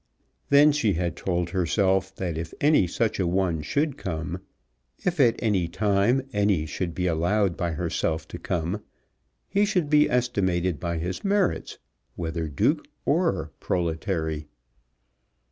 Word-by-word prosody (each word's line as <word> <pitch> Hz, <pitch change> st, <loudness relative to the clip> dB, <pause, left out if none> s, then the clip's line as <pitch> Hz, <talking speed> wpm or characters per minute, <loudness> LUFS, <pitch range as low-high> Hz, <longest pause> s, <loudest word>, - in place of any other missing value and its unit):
Then 145 Hz, +1 st, +7 dB
she 125 Hz, -9 st, +1 dB
had 85 Hz, 0 st, -1 dB
told 85 Hz, -2 st, -2 dB
herself 95 Hz, +1 st, +1 dB
that 90 Hz, -4 st, -3 dB
if 80 Hz, 0 st, -5 dB
any 145 Hz, -, +4 dB
such 110 Hz, +5 st, -1 dB
a 90 Hz, -, +1 dB
one 85 Hz, -3 st, 0 dB
should 145 Hz, -, -1 dB
come, 85 Hz, -1 st, -4 dB, 0.7 s
if 175 Hz, -2 st, 0 dB
at 120 Hz, -4 st, +5 dB
any 100 Hz, -7 st, +1 dB
time 100 Hz, +7 st, +2 dB
any 100 Hz, -6 st, +2 dB
should 85 Hz, +2 st, -4 dB
be 90 Hz, -, -1 dB
allowed 90 Hz, +3 st, +1 dB
by 85 Hz, -3 st, -2 dB
herself 80 Hz, -1 st, -2 dB
to 85 Hz, -, -7 dB
come, 90 Hz, +4 st, -2 dB, 0.7 s
he 200 Hz, -, +2 dB
should 180 Hz, -8 st, 0 dB
be 150 Hz, 0 st, +5 dB
estimated 95 Hz, -9 st, 0 dB
by 85 Hz, -1 st, -2 dB
his 90 Hz, +3 st, -4 dB
merits, 200 Hz, -2 st, 0 dB, 0.4 s
whether 80 Hz, -1 st, -3 dB
Duke 70 Hz, -3 st, +1 dB, 0.2 s
or -, -, +1 dB
proletary. 80 Hz, -3 st, -2 dB
95 Hz, 140 wpm, -26 LUFS, 85-110 Hz, 0.7 s, Then